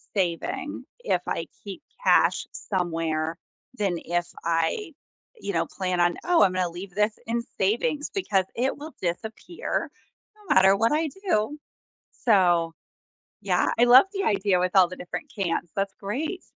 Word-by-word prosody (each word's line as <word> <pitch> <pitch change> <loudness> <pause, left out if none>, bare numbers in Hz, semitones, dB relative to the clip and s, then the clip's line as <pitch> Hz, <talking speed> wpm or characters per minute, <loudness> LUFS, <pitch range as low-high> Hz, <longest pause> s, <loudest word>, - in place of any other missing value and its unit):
saving 175 -4 -2
if 485 - +1
I - - -2 0.2
keep - - -8 0.2
cash - - +4
somewhere 165 -3 -2 0.4
than 195 -4 +1
if 175 +1 0 0.2
I, 170 - 0 0.5
you - - -3
know, - - +1
plan 185 -2 -2
on: 175 0 +3
“Oh, 350 -2 +4
I'm 185 - +3
gonna 180 -1 0
leave 180 +3 -8
this 210 +1 +1
in 235 +1 -1 0.2
savings 240 +9 0
because 205 - +1
it 255 +3 0
will 300 +1 -9
disappear 220 - -3 0.5
no 420 -2 -2
matter 190 +1 +7
what 225 +3 +2
I 310 +2 +2
do,” 300 - -1 0.6
so, 175 - +3 0.7
yeah, - - +2
I 240 - +7
love 245 +5 +9
the 395 -1 -2
idea 195 -3 +2
with 180 0 0
all 185 -2 +8
the 180 - -8
different 290 - -7
cans, 175 -4 -2
that's 195 0 -1
great. 290 - -3
195 Hz, 150 wpm, -26 LUFS, 175-260 Hz, 0.7 s, love